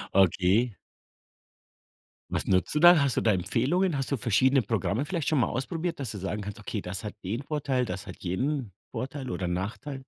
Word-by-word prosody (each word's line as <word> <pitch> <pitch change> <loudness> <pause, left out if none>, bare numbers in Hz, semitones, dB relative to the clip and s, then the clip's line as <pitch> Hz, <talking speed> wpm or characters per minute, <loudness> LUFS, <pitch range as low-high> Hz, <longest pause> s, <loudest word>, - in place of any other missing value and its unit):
Okay. 95 +4 +3 1.6
Was - - -2
nutzt 90 - +2
du 150 - +2
da? 175 -2 +8
Hast 140 -3 +1
du - - +3
da 110 - +3
Empfehlungen? 140 - +1
Hast 135 0 -2
du 140 - +1
verschiedene 130 +4 +3
Programme 110 +4 -1
vielleicht 165 -2 -2
schon 155 - +3
mal - - +3
ausprobiert, 160 +6 -3
dass 125 -5 -3
du 105 - -6
sagen 105 +2 -3
kannst: 105 +2 -6
„Okay, 105 0 -4
das 90 +3 -6
hat 105 - -5
den 110 +8 -3
Vorteil, 140 -4 -1
das 100 -4 -5
hat - - -8
jenen 125 +4 -1 0.2
Vorteil 130 +2 -5
oder 90 - -2
Nachteil?“ 115 - -4
125 Hz, 190 wpm, -28 LUFS, 100-140 Hz, 1.6 s, da